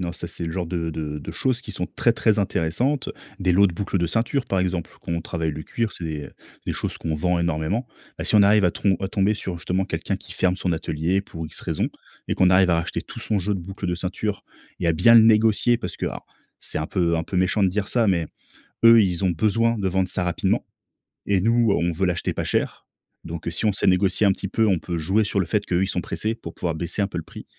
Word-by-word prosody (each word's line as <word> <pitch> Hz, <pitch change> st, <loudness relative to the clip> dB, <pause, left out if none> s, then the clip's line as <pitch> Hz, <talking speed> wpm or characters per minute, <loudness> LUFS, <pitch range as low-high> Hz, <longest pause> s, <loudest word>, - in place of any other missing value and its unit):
non, 90 Hz, -1 st, -2 dB
ça 85 Hz, 0 st, -7 dB
c'est 85 Hz, -, -6 dB
le 80 Hz, -, -3 dB
genre 90 Hz, +1 st, -3 dB
de 85 Hz, -1 st, -2 dB
de 75 Hz, -1 st, -4 dB
de -, -, -7 dB
choses 130 Hz, -3 st, 0 dB
qui -, -, -9 dB
sont -, -, -3 dB
très, -, -, +1 dB
très 110 Hz, -1 st, +2 dB
intéressantes. 100 Hz, -, 0 dB, 0.3 s
Des 95 Hz, -1 st, +2 dB
lots 100 Hz, +3 st, +5 dB
de -, -, -6 dB
boucles 95 Hz, +3 st, -2 dB
de 85 Hz, -, +1 dB
ceinture 120 Hz, +6 st, 0 dB
par 95 Hz, -, -1 dB
exemple, 90 Hz, -2 st, -1 dB
quand -, -, -5 dB
on 85 Hz, -, -1 dB
travaille 80 Hz, -1 st, -3 dB
le 75 Hz, +1 st, -6 dB
cuir, 115 Hz, +7 st, -2 dB
c'est -, -, -11 dB
des 75 Hz, -2 st, -4 dB, 0.4 s
des -, -, 0 dB
choses -, -, -3 dB
qu'on 80 Hz, -1 st, -2 dB
vend 90 Hz, +3 st, +1 dB
énormément. 85 Hz, +7 st, -1 dB, 0.3 s
Bah, -, -, -3 dB
si -, -, 0 dB
on 105 Hz, -, +7 dB
arrive 105 Hz, 0 st, +5 dB
à 90 Hz, -, +3 dB
trom 95 Hz, -2 st, +1 dB
à 95 Hz, -, -1 dB
tomber 100 Hz, +1 st, +1 dB
sur 95 Hz, -4 st, -5 dB
justement, 90 Hz, +2 st, -1 dB
quelqu'un -, -, -3 dB
qui -, -, -12 dB
ferme 90 Hz, -1 st, +1 dB
son 90 Hz, -2 st, -1 dB
atelier 80 Hz, +3 st, -1 dB
pour 80 Hz, -5 st, -7 dB
X -, -, -10 dB
raisons, -, -, -1 dB, 0.4 s
et -, -, -1 dB
qu'on 90 Hz, -1 st, +4 dB
arrive 95 Hz, 0 st, +5 dB
à -, -, +4 dB
racheter 85 Hz, 0 st, -2 dB
tout -, -, -9 dB
son 105 Hz, -, 0 dB
jeu 100 Hz, +2 st, -1 dB
de 95 Hz, -, -4 dB
boucles 95 Hz, +2 st, -6 dB
de 90 Hz, -, 0 dB
ceinture 95 Hz, +4 st, -3 dB, 0.4 s
et 85 Hz, -, +1 dB
à -, -, +4 dB
bien 115 Hz, +9 st, +5 dB
le 115 Hz, -, +10 dB
négocier, 110 Hz, +2 st, +4 dB
parce -, -, -6 dB
que, -, -, -2 dB
alors, -, -, -6 dB, 0.3 s
c'est -, -, -3 dB
un 75 Hz, -, -2 dB
peu 85 Hz, -3 st, +1 dB
un 80 Hz, -, -1 dB
peu 90 Hz, -, -5 dB
méchant 95 Hz, +3 st, +2 dB
de 95 Hz, -, +5 dB
dire 100 Hz, +2 st, -2 dB
ça. 115 Hz, 0 st, +2 dB
Mais, 85 Hz, -4 st, +1 dB, 0.6 s
eux, 115 Hz, -1 st, +9 dB
ils 90 Hz, -1 st, 0 dB
ont 95 Hz, -, +3 dB
besoin 115 Hz, +6 st, +1 dB
de 100 Hz, -2 st, -1 dB
vendre 95 Hz, 0 st, 0 dB
ça 90 Hz, -, -1 dB
rapidement 90 Hz, -1 st, 0 dB, 0.6 s
et 100 Hz, -2 st, +2 dB
nous, 115 Hz, +2 st, +3 dB
on 85 Hz, -3 st, +1 dB
veut 95 Hz, +4 st, 0 dB
l'acheter 90 Hz, -1 st, -1 dB
pas -, -, -3 dB
cher. -, -, -1 dB, 0.4 s
Donc, 85 Hz, 0 st, -7 dB
heu, 85 Hz, -, 0 dB
si 85 Hz, -, -2 dB
on 105 Hz, -, +4 dB
sait 95 Hz, -, -1 dB
négocier 95 Hz, +3 st, +3 dB
un -, -, +5 dB
petit 95 Hz, -, -5 dB
peu, 110 Hz, +2 st, +2 dB
on 95 Hz, -3 st, +3 dB
peut 85 Hz, +2 st, -4 dB
jouer 95 Hz, +7 st, +2 dB
sur 100 Hz, -, -1 dB
le 95 Hz, -, +1 dB
fait 105 Hz, +4 st, -1 dB
qu'eux, 90 Hz, +1 st, +1 dB
ils -, -, 0 dB
sont 90 Hz, -2 st, -2 dB
pressés, 110 Hz, +6 st, -2 dB
pour -, -, -9 dB
pouvoir 85 Hz, -3 st, -2 dB
baisser 85 Hz, +5 st, -2 dB
un 100 Hz, -, +2 dB
peu -, -, -6 dB
le 80 Hz, -, -3 dB
prix. -, -, -11 dB
95 Hz, 265 wpm, -23 LUFS, 85-105 Hz, 0.6 s, le